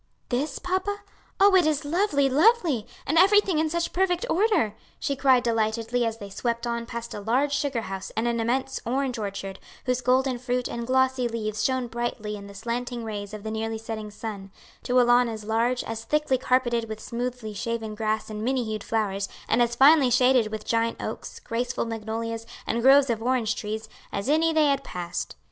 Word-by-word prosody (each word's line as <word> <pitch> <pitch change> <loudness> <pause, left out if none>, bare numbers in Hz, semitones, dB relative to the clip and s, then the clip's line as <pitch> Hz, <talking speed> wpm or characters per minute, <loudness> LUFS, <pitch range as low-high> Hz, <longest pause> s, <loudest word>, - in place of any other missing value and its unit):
"This, 270 +3 -1
papa? 375 +3 -2 0.4
Oh 400 0 +6
it 355 -4 +5
is 305 -1 0
lovely, 300 -3 +2
lovely! 305 - +3 0.2
and 320 +4 +3
everything 390 -3 +5
in 315 0 +1
such 340 +1 -2
perfect 360 +2 +1
order," 365 - +2 0.3
she 280 - -1
cried 260 -2 +4
delightedly 230 +1 0
as 225 0 -3
they 200 -2 -9
swept 235 +3 -2
on 235 -1 -3
past 235 -1 -6
a - - -5
large 255 +7 +1
sugar 275 -4 0
house 195 -1 -6
and 225 +2 +1
an 235 -1 0
immense 260 +4 -1
orange 255 0 -1
orchard, 195 -2 -5 0.3
whose 250 -1 0
golden 255 0 +2
fruit 250 0 -1
and 235 0 -5
glossy 260 -1 +2
leaves 215 -2 -3
shone 260 0 +1
brightly 235 -3 -3
in 200 -1 -9
the 200 - -12
slanting 240 +3 -3
rays 205 -2 -5
of 215 -1 -8
the 220 - -4
nearly 220 0 -2
setting 220 -1 -6
sun, 205 -2 -7 0.3
to 250 0 +2
a - - +6
lawn 240 0 +4
as 220 -2 -6
large, 235 +3 +1
as 225 0 -5
thickly 300 0 +1
carpeted 240 -3 +1
with 220 0 -5
smoothly 240 -2 -4
shaven 225 0 -3
grass 215 0 -1
and 215 0 -5
many 255 +1 +1
hued 215 -1 -4
flowers, 200 -3 -1 0.2
and 240 - +3
as 235 0 +2
finely 275 +1 +6
shaded 250 -1 +4
with 215 -1 -5
giant 230 0 0
oaks, - - -6
graceful 240 +2 -2
magnolias, 225 0 -4 0.2
and 235 - -1
groves 270 +1 +6
of 225 -1 -2
orange 240 -2 +1
trees, 215 +1 -4 0.2
as 200 +3 -3
any 320 +2 +3
they 315 -1 +4
had 275 -1 +1
passed. 175 -5 -5
240 Hz, 195 wpm, -26 LUFS, 220-265 Hz, 0.4 s, Oh